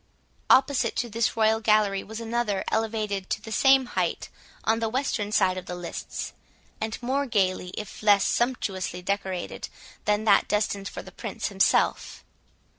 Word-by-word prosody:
Opposite 265 -3 +4
to 240 -2 -2
this 230 +1 0
royal 220 0 +3
gallery 210 -3 +2
was 220 +1 -7
another, 230 -3 -1
elevated 215 -3 -1
to - - -1
the 220 +1 -10
same 270 +3 +5
height, - - -2 0.3
on 225 0 +2
the 225 -1 -1
western 225 -4 -1
side 185 -3 +2
of - - -13
the 180 - -4
lists; 175 -1 -6 0.5
and 220 0 -2
more 275 +3 0
gaily, 185 -5 0
if 210 - -7
less 205 -2 +5
sumptuously 195 -7 -1
decorated, 190 -2 -3 0.4
than 210 +1 +2
that 210 -2 +4
destined 200 -1 0
for - - -7
the - - -12
Prince - - -4
himself. - - +1
215 Hz, 155 wpm, -26 LUFS, 200-230 Hz, 0.5 s, same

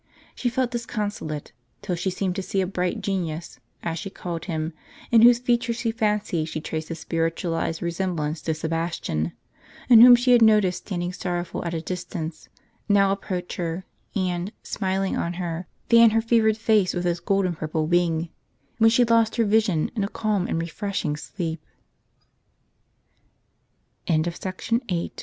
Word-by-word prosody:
She 245 - -1
felt 245 +1 -1
disconsolate, 210 - -4 0.3
till 185 - -2
she 180 +3 -1
seemed 185 0 -2
to 195 - -2
see 195 +1 -2
a 190 - +2
bright 180 -1 -2
genius 170 -4 -3 0.2
(as 165 -1 -2
she 195 - -5
called 170 -3 -6
him), 160 -2 -3 0.4
in 230 -2 +7
whose 240 +1 +8
features 240 -1 0
she 230 -1 -1
fancied 210 -7 0
she 155 - -4
traced 155 0 -5
a 165 - -3
spiritualized 165 0 -2
resemblance 170 -3 -2
to 160 - -1
Sebastian, 160 - -2 0.6
and 230 -2 +10
whom 245 0 +11
she 245 +1 +2
had 240 -1 +6
noticed 210 -5 +4
standing 175 -2 -3
sorrowful 175 -2 -3
at 170 0 -2
a 160 - -2
distance, 170 -3 -5 0.4
now 200 -1 +4
approach 185 -2 -4
her, 170 +1 -3 0.3
and, 180 0 -1
smiling 190 -1 -1
on 170 - -2
her, 175 -1 -4 0.2
fan 230 -1 +7
her 225 +1 +2
fevered 225 -2 +3
face 215 -5 +2
with 175 - -1
his 175 0 0
gold 195 +1 +1
and 175 -3 -2
purple 155 0 -2
wing; 170 -1 +1 0.5
when 225 0 +7
she 235 +2 +4
lost 230 -1 +3
her 230 - +2
vision 205 -6 +2
in 210 - 0
a - - 0
calm 210 -5 -1
and - - -1
refreshing 170 -1 -2
185 Hz, 150 wpm, -24 LUFS, 165-215 Hz, 0.6 s, whom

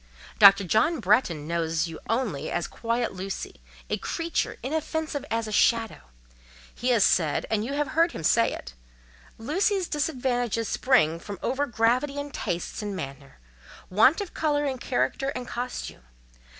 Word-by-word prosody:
Dr. 200 -1 +8
John 220 - +2
Bretton 180 - +2
knows 165 -1 0
you 165 -1 -8
only 210 - -1
as 175 -1 -2
'quiet 235 0 -2
Lucy'—'a 190 +1 -6
creature 335 -1 -2
inoffensive 310 +1 -2
as 225 0 -1
a - - -5
shadow;' 225 - +1 0.6
he 250 - -2
has 235 -5 +4
said, 160 -5 +2
and 215 -1 +1
you 260 +5 -4
have 290 -1 -1
heard 335 +2 +3
him 165 - -7
say 115 -6 +3
it: - - -8 0.6
'Lucy's 365 - 0
disadvantages 245 -6 -1
spring 170 - +2
from 200 +3 -7
over 275 +3 0
gravity 245 +5 +1
in 285 0 -4
tastes 175 -4 -4
and 205 -2 -4
manner—want 140 - -1
of 395 - -6
colour 295 -2 0
in 265 -2 -2
character 270 +2 -1
and 250 -1 -5
costume. 245 - -5
230 Hz, 145 wpm, -26 LUFS, 180-280 Hz, 0.6 s, Dr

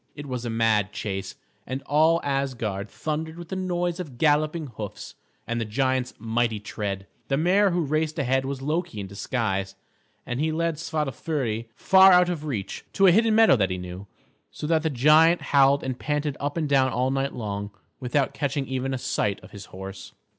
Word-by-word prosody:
It 145 - -7
was 125 -3 -4
a - - -2
mad 110 -3 +2
chase, 95 -2 -4 0.3
and 130 +1 -4
all 160 +3 +3
Asgard 120 -8 -2
thundered 160 +5 -4
with 175 -1 -9
the - - -3
noise 175 -1 -1
of 145 -9 -7
galloping 155 +3 +2
hoofs 105 -2 -7 0.3
and 120 0 -2
the - - +1
giant's 130 +3 -1
mighty 115 0 0
tread. 100 -2 -4 0.2
The 135 - +1
mare 190 +6 +4
who 175 -1 0
raced 155 +2 -1
ahead 130 -2 +1
was 135 0 -4
Loki 165 - -2
in 100 - -4
disguise, 100 -1 -2 0.5
and 120 +1 -3
he 160 +1 +1
led 165 0 -1
Svadilföri 140 -7 -2
far 190 +5 +7
out 180 0 +5
of 160 -4 -3
reach, 105 -10 -4
to 195 - +4
a 185 - +8
hidden 220 +3 +4
meadow 225 -8 +6
that 95 -5 +1
he 95 - -2
knew; 90 +2 -8 0.4
so - - -7
that 160 0 +2
the 160 - 0
giant 155 +6 +5
howled 140 0 +5
and 130 -1 -4
panted 150 -1 -1
up 145 +3 -3
and 155 -2 0
down 135 -2 +3
all 125 +3 0
night 135 0 -1
long, 100 -3 -4 0.3
without 130 +2 0
catching 140 -1 -2
even 130 0 -2
a - - -2
sight 105 -4 -1
of - - -14
his 100 - -9
horse. 95 +1 -9
135 Hz, 190 wpm, -25 LUFS, 115-160 Hz, 0.5 s, a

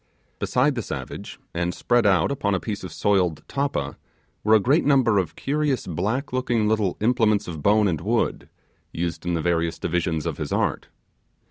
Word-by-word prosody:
Beside 135 +4 +2
the 120 - -2
savage, 65 - -7
and 85 +1 -1
spread 120 -3 +2
out 95 +6 +3
upon 100 -8 0
a - - 0
piece 105 -1 -5
of 95 - -6
soiled 90 -6 +1
tappa, 135 - -2 0.5
were 110 +1 +5
a - - +6
great 135 - +3
number 130 -7 +4
of 90 - -3
curious 145 -2 -1
black 105 - -2
looking 120 -4 +1
little 105 -4 +1
implements 110 -2 +2
of 80 -4 -6
bone 105 +4 +4
and 80 -5 -1
wood, 115 +6 -1 0.4
used 85 0 -4
in 85 - +1
the 80 - -1
various 85 -1 0
divisions 85 -2 -1
of - - -3
his - - -4
art. - - 0
105 Hz, 175 wpm, -24 LUFS, 85-120 Hz, 0.5 s, a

